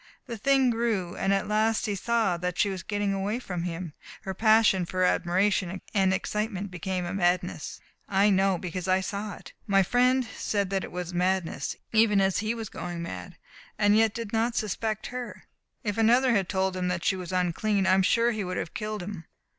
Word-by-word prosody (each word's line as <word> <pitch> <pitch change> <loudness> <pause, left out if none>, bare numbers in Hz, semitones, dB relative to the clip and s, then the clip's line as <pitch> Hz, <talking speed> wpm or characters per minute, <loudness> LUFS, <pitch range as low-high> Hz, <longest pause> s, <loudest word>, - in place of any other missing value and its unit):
The 235 - -5
thing 265 +2 +3
grew, 225 -7 -1
and 195 - 0
at 195 -1 +1
last 215 +1 +1
he 205 - -1
saw 220 -1 +1
that 180 0 -3
she 200 - +2
was 190 -2 -5
getting 205 +1 -1
away 195 +3 -1
from 180 -8 -4
him. 170 -2 -5 0.3
Her 190 - -4
passion 215 -2 +4
for 185 +2 -1
admiration 185 +1 +1
and 190 -2 +3
excitement 205 0 -2
became 180 +1 -3
a 175 - -4
madness. 180 -3 -1 0.3
I 200 +1 +4
know, 190 -1 +3
because 180 +1 -5
I 185 0 +3
saw 200 +2 -4
it. - - -13
My 195 -1 +4
friend 250 +5 +3
said 200 -2 -1
that 195 -1 0
it - - -7
was 180 0 -5
madness, 180 -1 -1 0.2
even 215 -2 +4
as 190 -1 +2
he 220 +2 -1
was 225 -2 -5
going 175 -2 -6
mad. 90 - -7 0.4
And 205 0 +4
yet 225 0 +3
he 230 - -2
did 210 - -11
not 230 +1 +1
suspect 215 +1 -2
her. 250 -1 -6 0.4
If 210 0 -2
another 245 +3 +4
had 195 -6 +1
told 190 -1 0
him 180 -1 -1
that 180 -1 -2
she 190 - +3
was 180 -2 -6
unclean 185 +3 +1
I 185 - +4
am 190 - +4
sure 230 +5 +3
he 215 -3 -3
would 180 0 -4
have 160 - -4
killed 215 -2 -4
him. 185 -4 -7
195 Hz, 205 wpm, -27 LUFS, 185-220 Hz, 0.4 s, passion